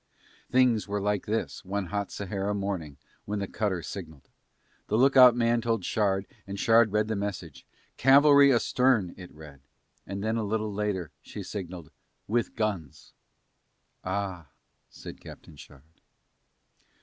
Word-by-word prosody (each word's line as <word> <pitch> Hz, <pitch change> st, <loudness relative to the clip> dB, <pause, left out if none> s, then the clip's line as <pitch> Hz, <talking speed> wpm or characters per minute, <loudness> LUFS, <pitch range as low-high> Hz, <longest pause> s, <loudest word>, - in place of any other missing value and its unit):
Things 125 Hz, -4 st, +3 dB
were 100 Hz, +1 st, -2 dB
like 105 Hz, 0 st, -1 dB
this 110 Hz, +2 st, -3 dB
one 100 Hz, +1 st, -3 dB
hot 100 Hz, -1 st, -2 dB
Sahara 100 Hz, +1 st, -3 dB
morning 95 Hz, -8 st, -4 dB, 0.3 s
when 105 Hz, +1 st, -3 dB
the 100 Hz, -, -2 dB
cutter 95 Hz, -6 st, -2 dB
signalled. 80 Hz, -8 st, -9 dB, 0.6 s
The 110 Hz, -, 0 dB
lookout 130 Hz, -1 st, +7 dB
man 120 Hz, 0 st, +2 dB
told 115 Hz, -5 st, -1 dB
Shard 100 Hz, -3 st, 0 dB, 0.2 s
and 100 Hz, 0 st, -6 dB
Shard 115 Hz, -1 st, +4 dB
read 105 Hz, +1 st, +1 dB
the 110 Hz, -, -2 dB
message, 100 Hz, -6 st, -6 dB, 0.3 s
"Cavalry 140 Hz, +1 st, +6 dB
astern" 120 Hz, -5 st, +2 dB
it 90 Hz, -1 st, -11 dB
read, 75 Hz, -3 st, -13 dB, 0.5 s
and 100 Hz, 0 st, -5 dB
then 110 Hz, +1 st, 0 dB
a 115 Hz, -, -1 dB
little 105 Hz, 0 st, -2 dB
later 100 Hz, -5 st, -2 dB
she 105 Hz, -, -8 dB
signalled, 90 Hz, -4 st, -7 dB, 0.4 s
"With 115 Hz, +3 st, -1 dB
guns." 100 Hz, -, -4 dB, 0.9 s
"Ah," 95 Hz, -3 st, -4 dB, 0.4 s
said -, -, -11 dB
Captain -, -, -13 dB
Shard. 70 Hz, -1 st, -15 dB
100 Hz, 135 wpm, -27 LUFS, 95-115 Hz, 0.9 s, lookout